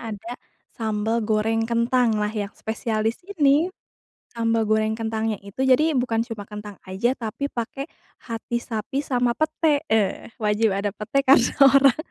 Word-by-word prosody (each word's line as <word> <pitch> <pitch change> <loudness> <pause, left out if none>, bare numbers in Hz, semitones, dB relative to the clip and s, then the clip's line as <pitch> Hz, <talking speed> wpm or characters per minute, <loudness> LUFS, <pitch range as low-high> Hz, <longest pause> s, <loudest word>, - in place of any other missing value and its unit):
ada, 225 +1 -6 0.4
sambal 220 0 -1
goreng 225 +1 0
kentang 235 0 +2
lah 210 0 -1
yang 210 -2 -3
spesialis 220 0 -2
ini, 305 -3 +3 0.6
sambal 230 -1 0
goreng 215 0 +2
kentangnya 220 -1 -2
itu 200 -1 -13
jadi, 295 +3 +4
bukan 235 -2 +1
cuma 220 -4 -6
kentang 210 -1 -9
aja, 200 +8 -1
tapi 240 +5 -4
pakai 245 +3 -4 0.4
hati 230 +1 -3
sapi 235 +4 -3
sama 245 -4 0
pete, 310 +1 +1
eee, 215 -2 0
wajib 215 +1 +2
ada 200 0 -2
pete, 275 +7 -1
karena 260 -2 +5
orang 275 -1 +6
225 Hz, 145 wpm, -23 LUFS, 215-255 Hz, 0.6 s, orang